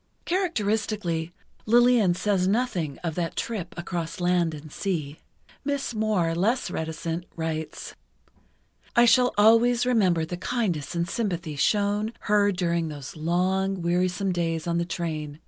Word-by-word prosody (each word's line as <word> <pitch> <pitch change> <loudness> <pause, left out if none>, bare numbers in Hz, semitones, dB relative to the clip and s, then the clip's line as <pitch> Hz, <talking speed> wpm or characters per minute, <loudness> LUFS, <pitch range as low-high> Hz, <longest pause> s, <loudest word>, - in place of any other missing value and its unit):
Characteristically, 215 - -1 0.4
Lillian 240 -5 +5
says 190 -1 +1
nothing 190 - 0
of 165 -2 -2
that 170 0 -3
trip 200 -7 -4
across 170 -1 -4
land 175 -2 +1
and 150 0 -11
sea. 155 -7 -3 0.4
Miss 280 -3 -2
Moir, 210 -7 +1
less 220 +9 0
reticent, 165 +1 -3
writes: 160 -1 -4 1.0
I 240 - +7
shall 250 +1 +5
always 230 +3 +5
remember 185 -10 +2
the 175 +2 -5
kindness 180 - -2
and 170 0 0
sympathy 175 -7 -2
shown 205 +7 +1
her 205 -1 +3
during 170 -3 0
those 145 -3 -8
long 185 +3 0
wearisome 180 +2 +1
days 165 -2 -1
on 170 0 0
the 170 - 0
train 155 -4 -4
180 Hz, 130 wpm, -26 LUFS, 165-215 Hz, 1.0 s, I